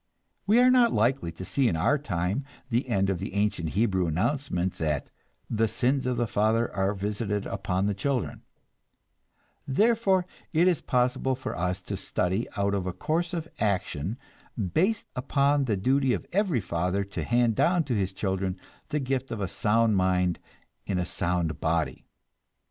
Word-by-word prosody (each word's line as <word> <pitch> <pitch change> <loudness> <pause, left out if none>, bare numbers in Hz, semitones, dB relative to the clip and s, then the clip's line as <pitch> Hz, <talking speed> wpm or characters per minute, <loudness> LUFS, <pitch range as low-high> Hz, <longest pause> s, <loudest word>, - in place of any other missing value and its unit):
We 215 +3 +5
are 250 +1 +6
not 245 -2 +5
likely 120 -4 +1
to 95 - -7
see 135 +4 +2
in 90 - +1
our 145 - +2
time 95 - -1 0.3
the 120 +3 0
end 100 -3 +2
of 90 - -2
the 95 +1 -5
ancient 100 -5 0
Hebrew 95 -5 +2
announcement 90 - 0
that 75 -3 -1 0.4
"the 115 0 +1
sins 130 +4 0
of 125 -1 0
the 120 - +1
father 110 +2 +1
are 95 +1 +1
visited 105 +1 -2
upon 95 -1 -1
the 105 - +1
children"; 130 +5 -2 1.3
therefore 195 - +3 0.3
it 165 +3 +4
is 175 -5 +2
possible 125 +1 +1
for 130 - -5
us 90 +1 -2
to 100 - -4
study 95 +2 -1
out 100 0 +1
a 95 -2 -1
course 160 - -1
of 165 -2 -3
action 95 - -1 0.6
based 195 +7 +2
upon 140 +2 +2
the 110 -5 0
duty 130 +5 +2
of - - -3
every 185 - +1
father 90 +2 -1
to 100 +1 -5
hand 120 -1 +2
down 175 - +3
to 135 - -2
his 100 -3 0
children 95 -1 -2 0.3
the 150 - 0
gift 135 -1 -2
of 110 - -4
a 100 - -1
sound 110 +2 +2
mind 90 -1 +2 0.5
in 95 - 0
a 90 - 0
sound 90 -4 -1
body. 80 0 -1
105 Hz, 165 wpm, -27 LUFS, 95-135 Hz, 1.3 s, are